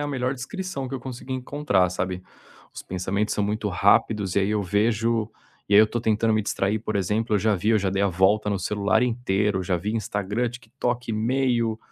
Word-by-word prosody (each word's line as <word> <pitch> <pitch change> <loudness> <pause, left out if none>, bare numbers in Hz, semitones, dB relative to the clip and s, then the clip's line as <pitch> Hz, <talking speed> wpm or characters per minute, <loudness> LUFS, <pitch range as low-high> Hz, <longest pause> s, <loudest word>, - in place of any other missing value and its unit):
a 145 - -2
melhor 130 -2 -1
descrição 135 +1 -5
que 135 - -6
eu 130 - -4
consegui 130 +1 -6
encontrar, 125 -9 0
sabe. 90 0 -3 0.5
Os - - -8
pensamentos 95 +3 -2
são 105 - 0
muito 105 +1 -1
rápidos 100 0 +2
e - - +6
aí 100 +1 0
eu 105 -1 0
vejo 110 +3 +1 0.4
e 100 - +2
aí 105 - +9
eu 110 - +6
tô 120 +2 -3
tentando 110 0 +1
me 110 - +2
distrair, 100 +1 0
por 110 -1 -3
exemplo, 105 +4 0
eu 105 - +4
já 110 +1 +2
vi, 105 +5 0
eu 110 - +4
já 95 -1 -1
dei 95 +1 0
a - - +4
volta 95 +3 +2
no 100 -1 0
celular 100 +4 +1
inteiro, 105 -5 0
eu - - -2
já 90 0 0
vi 100 +5 -3
Instagram, 105 +2 -1
TikTok, 120 0 -4
e-mail, 115 0 0
110 Hz, 215 wpm, -24 LUFS, 100-120 Hz, 0.5 s, aí